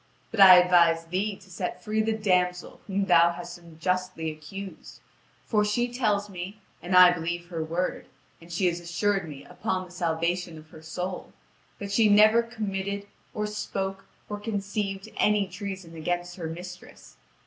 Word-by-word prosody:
But 225 - -5
I 190 -2 +11
advise 170 -2 +4
thee 190 +5 -2
to 190 0 -18
set 180 +1 -4
free 215 0 0
the 220 +1 0
damsel 180 -3 0
whom 200 0 0
thou 170 -2 +5
hast 175 0 -8
unjustly 170 0 -3
accused; 190 +6 -9 0.5
for 210 -2 +2
she 240 +4 0
tells 210 -5 +1
me, 195 +2 -7 0.2
and 180 +1 -1
I 180 -1 +10
believe 175 0 -4
her 165 -3 -3
word, 170 +3 -3 0.3
and 170 +1 -14
she 175 +3 0
has 175 -1 +1
assured 175 +1 -1
me 140 -2 -10
upon 185 -4 -3
the 180 - -16
salvation 170 0 -1
of 155 0 -15
her 155 - -12
soul, 180 +3 -5 0.4
that 200 -1 -6
she 215 +1 +4
never 215 +3 +6
committed, 200 -3 -4 0.3
or 210 - -1
spoke, 195 -2 -4 0.2
or 210 -1 -5
conceived 200 -2 -3
any 210 -2 +3
treason 190 -2 -7
against 175 +2 -3
her 165 -3 -4
mistress. 180 +2 -10
185 Hz, 160 wpm, -27 LUFS, 175-205 Hz, 0.5 s, I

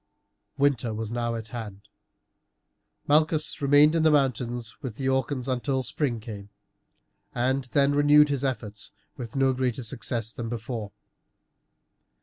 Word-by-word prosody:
Winter 125 -5 +1
was 110 0 -4
now 120 -1 -1
at 115 0 -7
hand. 105 -5 -8 1.2
Malchus 155 +1 +2
remained 145 +2 +5
in 165 - +2
the 160 - +5
mountains 120 -5 0
with 125 -5 -5
the 135 - -3
Orcans 130 0 0
until 130 +1 -1
spring 125 -1 -2
came, 105 -2 -9 0.9
and 130 +2 0
then 140 +2 +2
renewed 145 +1 +6
his 140 -2 -1
efforts 110 -6 -4 0.2
with 120 -5 -8
no 135 -1 +3
greater 130 -1 -1
success 115 -1 -4
than 115 -1 -5
before. 110 -2 -5
125 Hz, 130 wpm, -26 LUFS, 115-140 Hz, 1.2 s, renewed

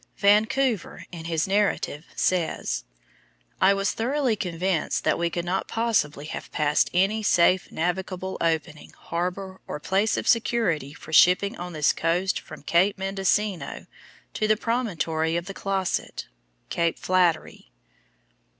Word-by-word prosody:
Vancouver 215 +2 +2
in 165 -2 -8
his 165 0 0
narrative 195 -6 0
says, 160 - -1 0.8
"I 195 +1 +5
was 195 0 0
thoroughly 255 0 0
convinced 180 -3 -1
that - - +1
we 170 0 +1
could 170 0 -3
not 185 +2 -1
possibly 210 -11 0
have - - -7
passed 150 0 +2
any 195 +5 +2
safe 185 -2 +3
navigable 185 +2 -2
opening, 160 -2 -2
harbor, 185 +2 -4
or - - -5
place 195 +7 +1
of - - -3
security 190 - +1
for 160 - -11
shipping 180 +5 +5
on 175 0 -6
this 150 -2 +2
coast 180 +3 0
from - - -12
Cape 180 +7 +2
Mendocino 195 0 -1 0.5
to 215 - 0
the 215 0 +3
promontory 170 -9 -1
of 170 - -3
Closset" 195 -1 -2 0.4
(Cape 170 -1 0
Flattery). 180 -4 0
185 Hz, 130 wpm, -25 LUFS, 165-200 Hz, 0.8 s, I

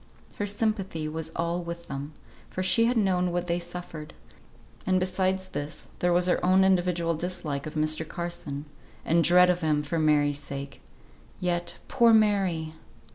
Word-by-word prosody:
Her 205 - -1
sympathy 200 -6 -1
was 160 +1 -5
all 170 +1 -1
with 170 0 -7
them, 140 +2 -6 0.4
for 185 - -3
she 230 +5 +4
had 240 +1 +1
known 180 -4 +2
what 175 0 -1
they 170 0 0
suffered; 170 -3 -8 0.7
and 185 0 +2
besides 185 0 0
this 145 +2 -5
there 175 - +2
was 175 +1 +3
her 180 - +1
own 185 +1 +5
individual 175 -3 +2
dislike 160 -4 -4
of 155 - -8
Mr. 155 +1 0
Carson, 170 -5 -5 0.4
and 165 +1 +3
dread 180 +2 +6
of 180 0 -2
him 150 -2 +1
for 160 +3 -2
Mary's 145 -2 +2
sake. 140 -1 -7 0.6
Yet, 175 -1 -1
poor 235 -3 +4
Mary! 195 -7 +2
175 Hz, 160 wpm, -27 LUFS, 155-185 Hz, 0.7 s, dread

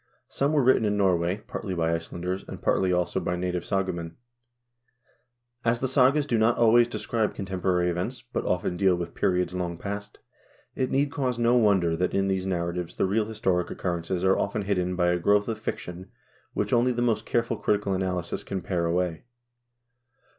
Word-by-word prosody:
Some 140 +2 0
were 145 -3 +3
written 130 -2 +4
in 105 -1 +1
Norway, 95 +1 +1
partly 95 -4 -4
by 85 -1 +1
Icelanders, 85 +3 -4
and - - -7
partly, 95 -1 +1
also, 90 -1 0
by 90 - -2
native 90 -1 -2
sagamen. 90 -4 -2 1.5
As 115 +1 +1
the 130 - 0
sagas 135 +3 +4
do 120 -6 +1
not 110 +2 +3
always 120 +1 +5
describe 115 -2 -2
contemporary 95 -2 0
events, 90 +9 -4
but 120 - -4
often 90 0 -1
deal 95 -1 +3
with 85 -1 -5
periods 90 -1 0
long 90 -2 -3
past, 100 +2 -6 0.6
it 130 -1 -1
need 140 +1 +1
cause 130 -4 -1
no 120 +1 +3
wonder 95 -8 +3
that 90 +2 -1
in 95 0 +2
these 95 0 -1
narra 85 -2 -1
tives 90 -1 -5
the - - +2
real 105 +3 +1
historic 95 -5 -1
occurrences 85 0 -3
are 95 0 +3
often 100 +1 -1
hidden 90 -2 0
by 90 -1 +2
a 90 0 +1
growth 100 +3 +3
of 110 -1 -3
fiction 95 -3 -6 0.4
which - - -1
only 120 +1 +4
the 120 0 -1
most 115 -3 0
careful 115 -1 0
critical 100 -2 0
analysis 90 -2 -2
can 95 -1 -4
pare 85 -3 -1
away. 85 +2 -1
95 Hz, 180 wpm, -26 LUFS, 90-115 Hz, 1.5 s, always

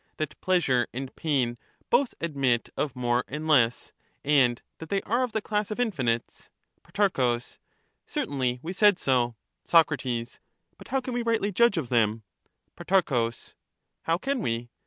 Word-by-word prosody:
That 155 -2 -4
pleasure 140 -10 +2
and 135 +1 -5
pain 130 -7 0 0.3
both 245 +1 +2
admit 135 -7 0
of 140 -3 -2
more 120 0 +1
and 150 +3 -5
less, 125 -6 +2 0.3
and 130 -5 +3 0.2
that 160 - -9
they 195 -1 0
are 235 +4 0
of 250 -2 -1
the 220 -1 -2
class 210 -1 -1
of 215 - -5
infinites. 130 - -1 0.3
Pro. 135 -13 +1 0.7
Certainly, 130 -3 -1
we 175 +3 -4
said 205 -1 +5
so. 120 -3 +1 0.3
Soc. 165 -1 +5
But 120 -3 -6
how 270 - 0
can 255 0 -5
we 240 - -1
rightly 230 -3 0
judge 235 0 +3
of 140 -7 -2
them? 115 -2 +1 0.5
Pro. 140 -11 +1 0.7
How 165 +1 +1
can 270 +8 -2
we 120 - -2
145 Hz, 150 wpm, -27 LUFS, 120-200 Hz, 0.7 s, said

